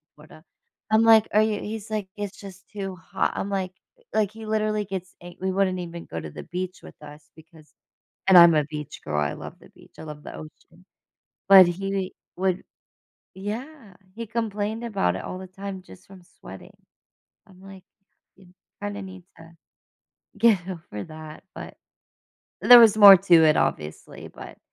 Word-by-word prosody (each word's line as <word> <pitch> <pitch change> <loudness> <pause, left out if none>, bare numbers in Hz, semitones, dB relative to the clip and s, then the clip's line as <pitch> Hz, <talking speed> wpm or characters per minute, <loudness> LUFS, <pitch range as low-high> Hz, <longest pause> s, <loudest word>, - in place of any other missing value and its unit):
Florida. 155 +1 -17 0.5
I'm 220 +1 +5
like, 225 -1 +6
are 210 - +5
you 215 -1 -1
he's 220 0 -7
like, 210 -3 -3
"It's 205 -1 -6
just 195 -1 -13
too 195 -2 -6
hot." 175 +2 -3
I'm 200 - -4
like, 190 -2 -3 0.4
like, 210 -2 +1
he 220 0 -11
literally 215 -1 -1
gets 185 -2 -7
ang 175 0 -12
we 190 0 -1
wouldn't 185 -1 0
even 170 -1 -8
go 80 - -6
to 80 -1 -9
the - - -9
beach 185 +1 -6
with - - -13
us 150 0 -14
because 160 -1 -19 0.5
and 190 -1 +7
I'm 170 -1 +8
a 150 -1 +2
beach 150 0 -8
girl. 75 -1 -2
I 75 -1 -1
love - - -10
the - - -18
beach. - - -21
I - - -8
love 150 -1 -9
the - - -9
ocean. 165 +3 -14 0.7
But 190 -2 +9
he 195 +1 -3 0.2
would 185 0 -1 0.7
Yeah. 220 +3 -8 0.2
He 230 +1 -6
complained 220 0 -3
about 195 - -1
it - - -6
all - - -6
the 190 - -9
time 190 +1 -8
just 185 0 -17
from 190 -2 -15
sweating. - - -14 0.8
I'm 185 -2 -19
like, 195 -1 -13 0.5
"You 185 -2 -20 0.3
kinda 205 0 -5
need 185 -1 -11
to 165 +1 -15 0.9
get 205 -5 +3
over 165 - -8
that," 155 -1 -11
but - - -10 0.8
there 245 -1 +9
was 220 -3 +6
more 200 -2 +10
to 180 -1 +2
it, 155 -1 +4
obviously, 75 0 -3
but - - -12
190 Hz, 175 wpm, -24 LUFS, 170-205 Hz, 0.9 s, more